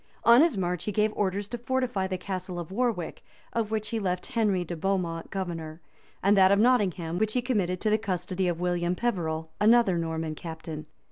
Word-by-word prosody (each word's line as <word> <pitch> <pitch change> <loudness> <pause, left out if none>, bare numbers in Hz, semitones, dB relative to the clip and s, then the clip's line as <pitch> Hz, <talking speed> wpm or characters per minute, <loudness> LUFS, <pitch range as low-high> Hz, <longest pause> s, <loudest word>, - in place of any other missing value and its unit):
On 235 +3 +7
his 320 -9 +3
march 180 -2 -1
he 210 - -1
gave 210 +1 +1
orders 200 0 -1
to 240 - -5
fortify 245 -5 -1
the 185 -1 -2
castle 185 -1 -5
of 175 +1 -7
Warwick, 220 -6 -1 0.3
of 230 -2 0
which 215 -1 -2
he 225 - -1
left 180 -3 -2
Henry 210 -7 +1
de 175 - -5
Beaumont 170 -2 -1
governor, 165 -4 -4 0.4
and 200 +2 +5
that 190 -1 +6
of 200 - +5
Nottingham, 190 -8 +2
which 215 0 +1
he 250 - +1
committed 195 -8 0
to 215 - +1
the 215 - +3
custody 185 -2 -2
of 170 -1 -1
William 175 0 0
Peverell, 160 -8 -2
another 210 -4 +5
Norman 160 -1 -2
captain. 160 -1 -7
190 Hz, 195 wpm, -27 LUFS, 175-215 Hz, 0.4 s, On